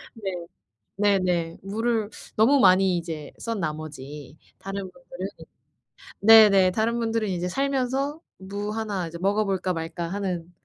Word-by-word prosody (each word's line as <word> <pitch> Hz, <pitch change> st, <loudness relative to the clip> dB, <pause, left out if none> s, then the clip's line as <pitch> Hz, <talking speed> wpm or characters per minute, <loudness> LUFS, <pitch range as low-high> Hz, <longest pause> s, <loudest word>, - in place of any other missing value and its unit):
네. 205 Hz, -4 st, -4 dB, 0.7 s
네네. 185 Hz, -5 st, +1 dB
무를 220 Hz, +2 st, -1 dB, 0.3 s
너무 245 Hz, +6 st, +5 dB
많이 185 Hz, -3 st, +5 dB
이제 160 Hz, -3 st, -6 dB
썬 230 Hz, -2 st, -3 dB
나머지 150 Hz, -2 st, -6 dB, 0.2 s
다른 195 Hz, +1 st, -5 dB
분들은 265 Hz, -, -8 dB, 0.9 s
네네. 200 Hz, -4 st, +8 dB
다른 230 Hz, +4 st, 0 dB
분들은 225 Hz, -1 st, 0 dB
이제 180 Hz, -1 st, -2 dB
살면서 275 Hz, -, -1 dB, 0.2 s
'무 200 Hz, +2 st, -5 dB
하나 210 Hz, -5 st, -3 dB
이제 170 Hz, +1 st, -8 dB
먹어볼까 195 Hz, -1 st, 0 dB
말까.' 165 Hz, +1 st, -4 dB
하는 180 Hz, -3 st, -3 dB
195 Hz, 255 characters per minute, -25 LUFS, 175-225 Hz, 0.9 s, 네네